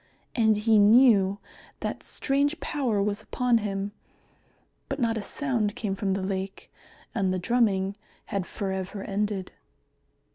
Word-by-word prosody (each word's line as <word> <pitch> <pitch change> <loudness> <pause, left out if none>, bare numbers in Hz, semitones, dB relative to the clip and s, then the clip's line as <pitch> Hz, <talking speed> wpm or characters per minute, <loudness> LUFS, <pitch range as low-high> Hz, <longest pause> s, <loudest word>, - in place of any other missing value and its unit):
And 220 -3 +4
he 215 0 +4
knew 205 -3 +6 0.4
that - - -3
strange 285 +4 0
power 240 -9 0
was 205 +1 -1
upon 240 +1 +1
him. 200 -1 -3 1.0
But 275 - -2
not 230 -3 +1
a 220 - -2
sound 230 -4 -1
came 215 -5 -2
from 195 0 -1
the 190 0 -2
lake, 190 0 -4 0.4
and 195 -4 +1
the 185 - 0
drumming 195 -2 +1 0.3
had 195 -2 -3
for 195 -2 -3
ever 190 +1 -4
ended. 200 -2 -2
205 Hz, 140 wpm, -27 LUFS, 195-235 Hz, 1.0 s, knew